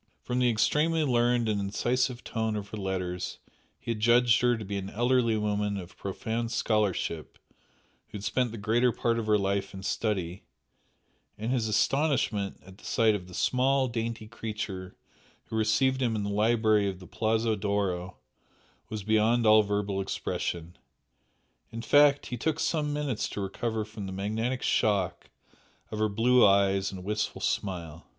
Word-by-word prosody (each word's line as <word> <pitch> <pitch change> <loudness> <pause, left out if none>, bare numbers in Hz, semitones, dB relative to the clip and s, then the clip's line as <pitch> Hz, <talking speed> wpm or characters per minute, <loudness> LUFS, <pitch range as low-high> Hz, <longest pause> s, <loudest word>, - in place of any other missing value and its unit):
From 125 +1 -1
the 125 -1 +3
extremely 155 +8 +2
learned 120 -3 +2
and 105 -2 0
incisive 120 +5 -1
tone 110 -1 -2
of 105 0 -5
her 110 - -6
letters 95 -2 -3 0.4
he - - -4
had 110 - -3
judged 120 0 +4
her 120 -1 +3
to 110 - -7
be 100 +1 -3
an 95 0 -6
elderly 120 0 +2
woman 105 -1 -1
of 90 -3 -9
profound 115 +4 -3
scholarship 105 -8 -1 0.7
who - - -8
had 100 - -9
spent 125 +1 0
the 115 - -7
greater 115 +4 +2
part 115 0 0
of 110 - -4
her 105 -1 +4
life 100 0 -1
in 95 - -8
study, 95 -4 -2 1.0
and 110 +3 -3
his 120 -4 +1
astonishment 110 -3 +1
at 95 +1 -14
the - - -19
sight 115 -2 +3
of 95 -3 -4
the 90 - -10
small, 130 +1 +2
dainty 115 -2 -4
creature 105 -5 -6 0.5
who - - -4
received 110 +5 +2
him 120 -3 +1
in 105 - -2
the 100 - -2
library 110 -1 +3
of 95 - -6
the 90 - -11
Palazzo 110 +2 0
d'Oro 100 -3 -2 0.7
was 105 -1 -5
beyond 110 +3 +2
all 110 0 +7
verbal 100 -1 -1
expression, 85 -3 -4 0.9
in 115 0 -6
fact, 145 +1 +5
he 125 - -5
took 160 +6 -1
some 150 -3 0
minutes 145 -6 -2
to - - -6
recover 110 +3 -2
from 105 -2 -7
the - - -6
magnetic 110 +6 -2
"shock" 100 -4 0 0.6
of 110 - -4
her 110 0 +2
blue 120 +4 +4
eyes 100 -1 +3
and 95 -2 -8
wistful 105 +2 -2
smile. 85 -5 -3
110 Hz, 165 wpm, -28 LUFS, 100-120 Hz, 1.0 s, all